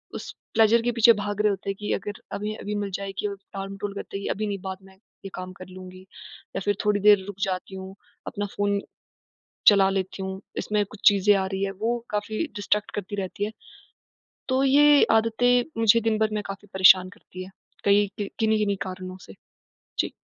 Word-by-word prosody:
उस -, -, -6 dB, 0.2 s
प्लेज़र 225 Hz, +1 st, +5 dB
के 240 Hz, -, 0 dB
पीछे 230 Hz, 0 st, +6 dB
भाग 205 Hz, -1 st, -3 dB
रहे 210 Hz, -, +3 dB
होते 200 Hz, 0 st, -3 dB
हैं, 195 Hz, -, -1 dB
कि 210 Hz, -, -3 dB
अगर 205 Hz, -, -5 dB
अभी, 210 Hz, +1 st, -3 dB
अभी 210 Hz, -1 st, -5 dB
मिल 205 Hz, -1 st, -2 dB
जाए 200 Hz, 0 st, -4 dB
कि 210 Hz, -, -1 dB
अ, 200 Hz, -, -4 dB, 0.2 s
टाल-मटोल 195 Hz, +1 st, -5 dB
करते 200 Hz, -, -6 dB
हैं 200 Hz, -, -7 dB
कि -, -, -3 dB
अभी 215 Hz, +1 st, -2 dB
नहीं, 200 Hz, -2 st, -3 dB
बाद 190 Hz, 0 st, -5 dB
में 190 Hz, 0 st, -17 dB
ये 195 Hz, 0 st, -14 dB
काम 185 Hz, 0 st, -6 dB
कर 185 Hz, -, -8 dB
लूँगी, 185 Hz, 0 st, -11 dB, 0.5 s
या -, -, 0 dB
फिर 205 Hz, -, +2 dB
थोड़ी 210 Hz, -1 st, +2 dB
देर 205 Hz, -1 st, +6 dB
रुक 205 Hz, -, -6 dB
जाती 190 Hz, 0 st, -2 dB
हूँ, 190 Hz, 0 st, -8 dB, 0.3 s
अपना 205 Hz, -, -3 dB
फ़ोन 205 Hz, 0 st, +1 dB, 0.9 s
चला 200 Hz, -2 st, +7 dB
लेती 190 Hz, 0 st, -3 dB
हूँ, 190 Hz, 0 st, -5 dB, 0.2 s
इसमें 210 Hz, -1 st, 0 dB
कुछ 205 Hz, +1 st, -14 dB
चीज़ें 205 Hz, 0 st, +4 dB
आ 190 Hz, -1 st, 0 dB
रही 190 Hz, 0 st, -3 dB
हैं, 195 Hz, -, -2 dB
वो 235 Hz, +2 st, 0 dB
काफ़ी 210 Hz, +4 st, -2 dB
डिस्ट्रैक्ट 205 Hz, 0 st, 0 dB
करती 205 Hz, 0 st, -4 dB
रहती 195 Hz, +1 st, -3 dB
हैं। 215 Hz, -, -4 dB, 1.0 s
तो 260 Hz, +1 st, +2 dB
ये 290 Hz, +1 st, +6 dB
आदतें 230 Hz, +2 st, +3 dB, 0.2 s
मुझे 225 Hz, +1 st, +6 dB
दिन 225 Hz, -1 st, +1 dB
भर 220 Hz, 0 st, +2 dB
में 210 Hz, -1 st, -2 dB
काफ़ी 195 Hz, +1 st, -8 dB
परेशान 185 Hz, -1 st, +6 dB
करती 185 Hz, 0 st, -11 dB
हैं, 190 Hz, -, -12 dB, 0.3 s
कई 205 Hz, 0 st, +4 dB
कि 205 Hz, -1 st, -3 dB
किन्ही-किन्ही 215 Hz, -2 st, +2 dB
कारणों 185 Hz, 0 st, -7 dB
से। 95 Hz, -, -11 dB, 0.7 s
जी। -, -, 0 dB
205 Hz, 205 wpm, -25 LUFS, 190-215 Hz, 1.0 s, चला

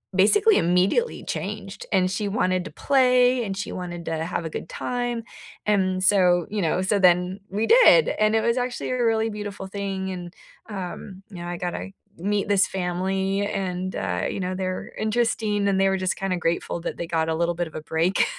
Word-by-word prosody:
basically 405 Hz, -, +5 dB
immediately 180 Hz, -, +1 dB
changed, -, -, -5 dB
and 185 Hz, -1 st, +3 dB
she 210 Hz, +1 st, -2 dB
wanted 185 Hz, -3 st, 0 dB
to -, -, -7 dB
play 250 Hz, -2 st, +3 dB
and 195 Hz, -2 st, -4 dB
she -, -, -4 dB
wanted 175 Hz, -2 st, -6 dB
to 160 Hz, 0 st, -2 dB
have 175 Hz, -1 st, -3 dB
a 160 Hz, -, -3 dB
good 160 Hz, -, -6 dB
time, 245 Hz, -1 st, -3 dB, 0.4 s
and 185 Hz, -3 st, +1 dB
so, 180 Hz, -3 st, +4 dB
you 210 Hz, -1 st, -2 dB
know 170 Hz, +2 st, +1 dB
so 190 Hz, +2 st, +1 dB
then 180 Hz, +1 st, +3 dB
we 210 Hz, +4 st, -1 dB
did, -, -, +7 dB
and 215 Hz, 0 st, +3 dB
it -, -, +4 dB
was 235 Hz, +2 st, +1 dB
actually 250 Hz, 0 st, -2 dB
a 250 Hz, -1 st, 0 dB
really 225 Hz, -1 st, +2 dB
beautiful 205 Hz, -2 st, -6 dB
thing, 190 Hz, -1 st, -4 dB
and, 175 Hz, -1 st, -7 dB, 0.4 s
um, 190 Hz, -1 st, -7 dB
you 190 Hz, -, -10 dB
know, 175 Hz, -, -6 dB
I 175 Hz, -, -4 dB
gotta 180 Hz, +2 st, -4 dB, 0.3 s
meet 200 Hz, +3 st, -1 dB
this 200 Hz, -1 st, +4 dB
family 190 Hz, +2 st, -1 dB
and, 185 Hz, -2 st, -3 dB
uh, 90 Hz, -2 st, -2 dB
you -, -, -4 dB
know, 185 Hz, 0 st, -2 dB
they're 185 Hz, 0 st, -4 dB
interesting 215 Hz, -2 st, 0 dB
and 195 Hz, -1 st, +2 dB
they 195 Hz, -, +4 dB
were 190 Hz, -, +1 dB
just 185 Hz, 0 st, -1 dB
kinda 190 Hz, -2 st, -1 dB
grateful 170 Hz, 0 st, -1 dB
that -, -, -4 dB
they 170 Hz, -, -4 dB
got 165 Hz, -1 st, 0 dB
a 160 Hz, -, 0 dB
little 170 Hz, +1 st, 0 dB
bit 175 Hz, 0 st, -2 dB
of 160 Hz, -, -14 dB
a 155 Hz, -, -4 dB
break. 165 Hz, +4 st, +1 dB
190 Hz, 200 wpm, -24 LUFS, 180-215 Hz, 0.4 s, did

